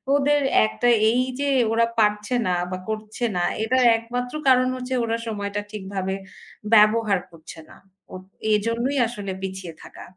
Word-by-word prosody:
ওদের 290 Hz, +1 st, +2 dB, 0.2 s
একটা 230 Hz, +2 st, -1 dB, 0.2 s
এইযে 255 Hz, +3 st, -1 dB, 0.2 s
ওরা 230 Hz, +1 st, +3 dB
পারছে 210 Hz, +3 st, +1 dB
না 180 Hz, -, +1 dB, 0.2 s
বা 185 Hz, -, -3 dB
করছে 215 Hz, +2 st, -4 dB
না। 175 Hz, -, 0 dB, 0.2 s
এটার 255 Hz, +2 st, +2 dB
একমাত্র 245 Hz, +2 st, -5 dB
কারণ 255 Hz, -1 st, +5 dB
হচ্ছে 255 Hz, 0 st, -5 dB
ওরা 230 Hz, 0 st, -1 dB
সময়টা 205 Hz, -1 st, -3 dB
ঠিকভাবে 190 Hz, -2 st, -4 dB, 0.6 s
ব্যবহার 215 Hz, -2 st, +4 dB
করছে 160 Hz, 0 st, -12 dB
না। -, -, -15 dB, 0.4 s
ওঁৎ 185 Hz, -, -8 dB, 0.3 s
এজন্যই 230 Hz, +6 st, 0 dB
আসলে 205 Hz, -4 st, -6 dB
পিছিয়ে 190 Hz, -3 st, -6 dB
থাকা। -, -, -12 dB
220 Hz, 140 wpm, -23 LUFS, 200-250 Hz, 0.6 s, কারণ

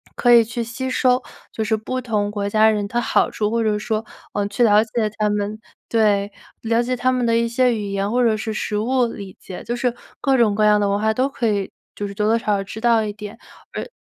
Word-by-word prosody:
可 245 Hz, -, +3 dB
以 235 Hz, -1 st, +8 dB
去 235 Hz, +1 st, -4 dB
吸 250 Hz, +3 st, -5 dB
收 255 Hz, 0 st, +2 dB, 0.3 s
就 220 Hz, -, -3 dB
是 220 Hz, +1 st, +1 dB
不 255 Hz, +4 st, -4 dB
同 215 Hz, -4 st, -1 dB
国 205 Hz, -1 st, -3 dB
家 215 Hz, +1 st, +4 dB
人 210 Hz, -2 st, 0 dB
他 235 Hz, +4 st, -1 dB
好 -, -, +1 dB
处， 210 Hz, -1 st, -1 dB
或 230 Hz, +1 st, 0 dB
者 210 Hz, -1 st, +1 dB
说， 220 Hz, +1 st, -2 dB, 0.3 s
呃， 205 Hz, -1 st, -1 dB
去 205 Hz, +4 st, -4 dB
了 210 Hz, -1 st, +5 dB
解 225 Hz, -1 st, -1 dB
他 215 Hz, -, +1 dB
们 210 Hz, +1 st, -2 dB, 0.3 s
对， 205 Hz, -3 st, +2 dB, 0.3 s
了 230 Hz, +1 st, +1 dB
解 255 Hz, +1 st, -1 dB
他 255 Hz, +1 st, +1 dB
们 250 Hz, -1 st, 0 dB
的 230 Hz, 0 st, +2 dB
一 235 Hz, 0 st, +1 dB
些 245 Hz, +1 st, +2 dB
语 205 Hz, -2 st, -4 dB
言 200 Hz, +1 st, -1 dB
或 250 Hz, +1 st, +2 dB
者 225 Hz, -2 st, +3 dB
是 220 Hz, +1 st, -4 dB
实 210 Hz, 0 st, -2 dB
物 245 Hz, +3 st, +1 dB
理 200 Hz, -4 st, -8 dB
解， 185 Hz, -, -9 dB
就 240 Hz, -, -3 dB
是 245 Hz, 0 st, 0 dB, 0.3 s
各 270 Hz, -1 st, +2 dB
种 225 Hz, -4 st, +3 dB
各 215 Hz, -, +2 dB
样 210 Hz, 0 st, +5 dB
的 205 Hz, -, +1 dB
文 200 Hz, +1 st, 0 dB
化 220 Hz, +1 st, +2 dB
都 255 Hz, +3 st, +2 dB
可 245 Hz, -4 st, -2 dB
以 200 Hz, -3 st, -1 dB, 0.2 s
就 205 Hz, -, -4 dB
是 200 Hz, -, -8 dB
多 210 Hz, +1 st, -1 dB
多 225 Hz, +1 st, +3 dB
少 230 Hz, -, -9 dB
少 195 Hz, -, -3 dB
知 205 Hz, +3 st, -8 dB
道 235 Hz, -2 st, +3 dB
一 210 Hz, -, -3 dB
点， 210 Hz, +1 st, -9 dB, 0.4 s
而 -, -, -4 dB
220 Hz, 275 characters per minute, -21 LUFS, 210-235 Hz, 0.4 s, 以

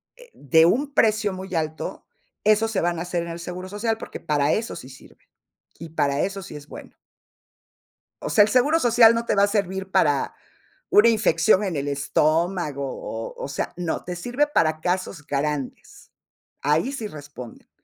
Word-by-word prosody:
eh, -, -, -17 dB
de 160 Hz, +4 st, +4 dB
un 280 Hz, +8 st, 0 dB
precio 215 Hz, -2 st, +2 dB
muy 185 Hz, -1 st, -6 dB
alto, 155 Hz, -1 st, -3 dB, 0.4 s
esos 215 Hz, +1 st, +3 dB
se 195 Hz, -, 0 dB
van 170 Hz, -1 st, 0 dB
a -, -, -3 dB
hacer 175 Hz, -1 st, -2 dB
en 170 Hz, -, -7 dB
el 170 Hz, 0 st, -6 dB
seguro 180 Hz, +2 st, -6 dB
social, 220 Hz, +2 st, -1 dB
porque, -, -, -8 dB
para 145 Hz, -1 st, +1 dB
eso 225 Hz, +1 st, -2 dB
sí 130 Hz, -, -9 dB
sirve 130 Hz, -, -17 dB, 0.5 s
y 165 Hz, +1 st, -9 dB
para 140 Hz, -2 st, 0 dB
eso 195 Hz, 0 st, -2 dB
sí 170 Hz, -, -10 dB
es 145 Hz, 0 st, -10 dB
bueno". -, -, -11 dB, 1.3 s
O -, -, -3 dB
sea, 205 Hz, -, +6 dB
el 215 Hz, -, +1 dB
seguro 285 Hz, +7 st, +3 dB
social 230 Hz, -3 st, +6 dB
no 230 Hz, 0 st, -2 dB
te -, -, +1 dB
va 200 Hz, -, +4 dB
a -, -, +5 dB
servir 190 Hz, -2 st, -2 dB
para 145 Hz, -6 st, +2 dB, 0.6 s
una 220 Hz, +3 st, +6 dB
infección 220 Hz, -2 st, +3 dB
en 190 Hz, -5 st, -2 dB
el 140 Hz, +1 st, -3 dB
estómago, 150 Hz, +1 st, 0 dB
o 115 Hz, -3 st, -6 dB
o -, -, -3 dB
sea, 140 Hz, -, -4 dB
no, 175 Hz, -2 st, -3 dB
te 180 Hz, -, -5 dB
sirve 245 Hz, +11 st, 0 dB
para 155 Hz, -, +1 dB
casos 180 Hz, -3 st, -2 dB
grandes, 145 Hz, -1 st, -4 dB, 0.5 s
ahí 150 Hz, -, +1 dB
sí 235 Hz, -6 st, -4 dB
responden. 145 Hz, -, -11 dB
180 Hz, 180 wpm, -23 LUFS, 150-215 Hz, 1.3 s, sea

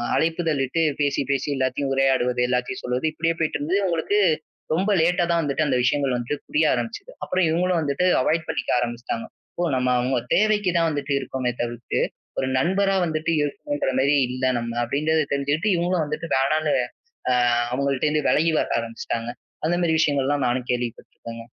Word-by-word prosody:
அழைப்புதலிட்டு 160 Hz, -3 st, 0 dB, 0.2 s
பேசி, 145 Hz, -1 st, +1 dB
பேசி 140 Hz, +1 st, 0 dB
எல்லாதையும் 135 Hz, +1 st, -1 dB
உரையாடுவது, 130 Hz, -2 st, +2 dB
எல்லாதையும் 125 Hz, 0 st, -1 dB
சொல்வது 125 Hz, +4 st, -2 dB
இப்படியே 165 Hz, +1 st, 0 dB
போயிட்டு 160 Hz, -1 st, 0 dB
இருந்தது. 175 Hz, +7 st, 0 dB
அவுங்களுக்கு 175 Hz, +4 st, +1 dB, 0.5 s
ரொம்ப 195 Hz, +5 st, +1 dB
லேட்டா 175 Hz, +2 st, +2 dB
தான் 170 Hz, -, +2 dB
வந்துட்டு 150 Hz, +1 st, 0 dB
அந்த 135 Hz, -3 st, +1 dB
விஷயங்கள் 140 Hz, +1 st, +1 dB
வந்துட்டு 125 Hz, +4 st, -4 dB
புரிய 155 Hz, +1 st, +2 dB
ஆரம்பிச்சுது. 120 Hz, -, -4 dB
அப்புறம் 185 Hz, -1 st, +1 dB
இவுங்களும் 175 Hz, +1 st, +1 dB
வந்துட்டு 145 Hz, +4 st, 0 dB, 0.2 s
அவாய்ட் 160 Hz, +3 st, +1 dB
பண்ணிக்க -, -, -3 dB
ஆரம்பிச்சுட்டாங்க. 120 Hz, -1 st, -3 dB, 0.3 s
இப்போ 175 Hz, -, -3 dB
நம்ம 125 Hz, 0 st, +1 dB
அவுங்க 125 Hz, +1 st, 0 dB, 0.2 s
தேவைக்குத்தான் 195 Hz, -5 st, +2 dB
வந்துட்டு 145 Hz, -2 st, -2 dB
இருக்கோமே 130 Hz, -2 st, -2 dB
தவிர்த்து, 120 Hz, -1 st, -2 dB, 0.4 s
ஒரு 130 Hz, -, 0 dB
நண்பரா 195 Hz, +6 st, +2 dB
வந்துட்டு 160 Hz, 0 st, -1 dB
இருக்கணும்கிற 145 Hz, -1 st, -2 dB
மாரி 140 Hz, +2 st, +3 dB
இல்ல 130 Hz, +1 st, -5 dB, 0.2 s
நம்ம 115 Hz, 0 st, -4 dB
அப்டின்றத 155 Hz, +5 st, +1 dB
தெரிஞ்சுக்கிட்டு 145 Hz, +9 st, 0 dB
இவுங்களும் 175 Hz, -1 st, +1 dB
வந்துட்டு 150 Hz, +2 st, -5 dB
வேணானு, 150 Hz, +3 st, +1 dB, 0.6 s
அ -, -, +4 dB, 0.4 s
அவுங்கட்ட 140 Hz, +2 st, 0 dB
இருந்து 150 Hz, -1 st, 0 dB
விலகி 160 Hz, +1 st, +3 dB
வர -, -, -1 dB
ஆரம்பிச்சுட்டாங்க. 115 Hz, 0 st, -4 dB, 0.3 s
அந்த 170 Hz, +2 st, +2 dB
மாரி 160 Hz, -1 st, +2 dB
விஷயங்கள்லாம் 140 Hz, -2 st, +1 dB
நானும் 125 Hz, 0 st, -1 dB
கேள்விப்பட்டிருக்கேங்க. 115 Hz, -1 st, -5 dB
145 Hz, 155 wpm, -23 LUFS, 130-165 Hz, 0.6 s, அ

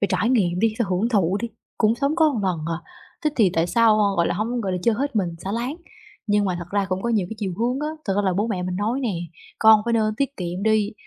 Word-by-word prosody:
phải 200 Hz, -, +1 dB
trải 235 Hz, -, +1 dB
nghiệm 180 Hz, -8 st, +2 dB
đi, 220 Hz, +2 st, +2 dB
phải 235 Hz, -, +1 dB
hưởng 185 Hz, +5 st, +1 dB
thụ 195 Hz, -5 st, +2 dB
đi, 235 Hz, -, -3 dB, 0.3 s
cũng 220 Hz, 0 st, +3 dB
sống 280 Hz, +5 st, -1 dB
có 305 Hz, -8 st, +3 dB
lần 185 Hz, -3 st, 0 dB
à, 165 Hz, -1 st, -2 dB, 0.5 s
thế 305 Hz, -, +3 dB
thì 210 Hz, -6 st, +4 dB
tại 165 Hz, +1 st, +2 dB
sao, 225 Hz, +3 st, +4 dB
a, 210 Hz, -, +4 dB
gọi 170 Hz, -1 st, +2 dB
là, -, -, 0 dB
hông, 235 Hz, +3 st, -2 dB
gọi 195 Hz, -4 st, -2 dB
là, 180 Hz, -, -1 dB
chơi 230 Hz, +2 st, +3 dB
hết 275 Hz, +2 st, -2 dB
mình 190 Hz, -4 st, +1 dB, 0.2 s
xả 195 Hz, -, -3 dB
láng. 245 Hz, +6 st, -2 dB, 0.5 s
Nhưng 205 Hz, -1 st, +2 dB
mà 185 Hz, -3 st, -1 dB
thật 175 Hz, -, -6 dB
ra 200 Hz, -1 st, 0 dB
cũng 185 Hz, 0 st, -2 dB
có 235 Hz, -, -1 dB
nhiều 210 Hz, -6 st, +1 dB
cái -, -, -4 dB
chiều 200 Hz, -4 st, -2 dB
hướng 245 Hz, +4 st, 0 dB
á, 300 Hz, -, -1 dB, 0.2 s
thật 195 Hz, -, 0 dB
ra 205 Hz, -, +2 dB
là 190 Hz, -2 st, +1 dB
bố 205 Hz, +5 st, 0 dB
mẹ 195 Hz, -6 st, -2 dB
mình 180 Hz, 0 st, -3 dB
nói 220 Hz, +7 st, -1 dB
nè, 255 Hz, -, -1 dB, 0.5 s
con 220 Hz, -1 st, +7 dB
phải 235 Hz, -, 0 dB
nên 215 Hz, -2 st, +1 dB
tiết 275 Hz, +2 st, -2 dB
kiệm 180 Hz, +1 st, -4 dB
đi 215 Hz, 0 st, +2 dB
215 Hz, 285 wpm, -23 LUFS, 190-235 Hz, 0.5 s, con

